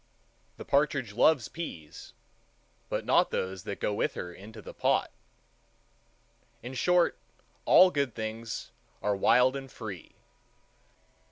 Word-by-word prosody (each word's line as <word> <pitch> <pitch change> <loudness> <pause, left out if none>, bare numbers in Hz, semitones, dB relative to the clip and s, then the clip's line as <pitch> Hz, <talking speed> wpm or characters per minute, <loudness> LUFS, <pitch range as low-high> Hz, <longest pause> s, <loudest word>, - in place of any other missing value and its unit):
The - - -9
partridge 140 -6 +1
loves 130 +3 +3
peas, 80 - -8 0.8
but - - -2
not - - +4
those 95 -1 -3
that 100 - -5
go 105 - -1
with 105 - -1
her 90 -1 -6
into 110 +4 -12
the - - -10
pot. - - +1 1.5
In 125 +2 -7
short, 175 +7 +2 0.5
all 185 0 +7
good 140 -6 -1
things 110 +1 -5 0.3
are 105 0 +1
wild 125 +6 +4
and 135 -1 -7
free. 100 -7 -9
115 Hz, 120 wpm, -29 LUFS, 100-140 Hz, 1.5 s, all